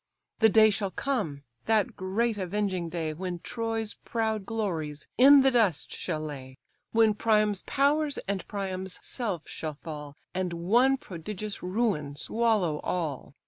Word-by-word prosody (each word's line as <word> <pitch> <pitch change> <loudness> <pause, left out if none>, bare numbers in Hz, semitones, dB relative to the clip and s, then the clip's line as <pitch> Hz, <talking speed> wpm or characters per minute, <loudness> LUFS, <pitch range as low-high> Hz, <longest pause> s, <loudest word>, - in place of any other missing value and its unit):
The 220 - +6
day 220 0 +6
shall 200 -1 -1
come, 175 - -2 0.2
that 220 -3 +2
great 215 +5 0
avenging 185 -2 -1
day, 160 -2 -2
When 180 +2 -4
Troy's 225 +3 -3
proud 220 -3 -1
glories 165 -10 -3
in 275 +2 +8
the 270 0 +4
dust 215 - +2
shall 160 -4 -3
lay, 135 -4 -7 0.3
When 225 -1 +4
Priam's 210 -2 +2
powers 290 +1 +2
and 195 -2 -2
Priam's 190 -2 -4
self 205 - -3
shall 155 -2 -5
fall, 150 -1 -8 0.2
And 180 -1 -1
one 235 +11 +3
prodigious 210 - -6
ruin 180 -8 -1
swallow 210 -4 +1
all. 150 -6 -3
195 Hz, 140 wpm, -28 LUFS, 165-225 Hz, 0.3 s, in